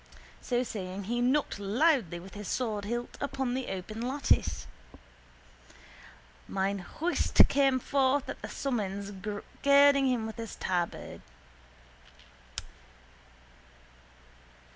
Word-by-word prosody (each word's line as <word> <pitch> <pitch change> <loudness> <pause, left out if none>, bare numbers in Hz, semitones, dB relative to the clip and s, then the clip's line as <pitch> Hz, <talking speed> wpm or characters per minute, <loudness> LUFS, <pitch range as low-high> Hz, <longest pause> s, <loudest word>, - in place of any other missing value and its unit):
So 245 0 0
saying 195 -4 -5
he 240 +5 -1
knocked 255 -2 +1
loudly 210 - +2
with 190 +3 -12
his 205 -1 -7
swordhilt 235 0 -2
upon 270 -3 -1
the 260 0 -2
open 205 +4 -5
lattice. 265 +4 +1 1.8
Mine 195 +1 -1
host 320 - -2
came 275 -2 +3
forth 275 +1 +2
at - - -6
the - - -6
summons, 200 -6 -2 0.5
girding 280 -1 +6
him 245 -3 +1
with 220 -1 -6
his 225 -2 -6
tabard. 175 -2 -2
240 Hz, 100 wpm, -30 LUFS, 200-270 Hz, 1.8 s, girding